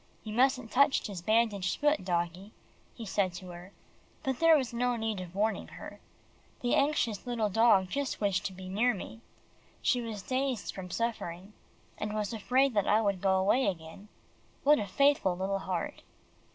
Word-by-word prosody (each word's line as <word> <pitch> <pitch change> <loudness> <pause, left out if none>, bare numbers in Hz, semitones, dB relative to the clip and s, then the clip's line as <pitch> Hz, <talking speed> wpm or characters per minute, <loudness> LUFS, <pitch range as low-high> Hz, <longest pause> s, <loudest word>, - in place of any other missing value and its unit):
"You 215 - -6
mustn't 255 -1 +2
touch 280 +2 +3
his 195 -4 -5
bandaged 215 -2 +1
feet, 295 -5 +2
doggie," 175 +3 -2 0.4
he 230 - -7
said 190 -2 0
to 180 +1 -9
her, 175 +2 -10 0.5
but 265 -2 -2
there 330 -1 +6
was 255 -5 -3
no 245 +1 +1
need 220 -4 -2
of 180 0 -9
warning 215 +2 0
her. - - -10 0.6
The 245 - 0
anxious 265 -8 +1
little 230 -3 0
dog 205 -2 +4
just 280 +7 -3
wished 200 -3 0
to 190 - -3
be 185 0 -9
near 215 +5 +1
me. 225 +4 -9 0.6
She 245 - +2
was 220 -4 -6
dazed 260 -3 -2
from 185 -1 -7
suffering, 200 -3 -4 0.5
and 210 0 -3
was 210 +1 -2
afraid 250 +5 +2
that 205 -3 +1
I 210 - +4
would 200 -4 0
go 190 -1 +3
away 205 +7 +2
again. 175 +2 -5 0.6
What 295 +1 +5
a 205 - -3
faithful 275 -6 +2
little 195 +1 -1
heart! 185 -3 -4
210 Hz, 175 wpm, -30 LUFS, 190-245 Hz, 0.6 s, there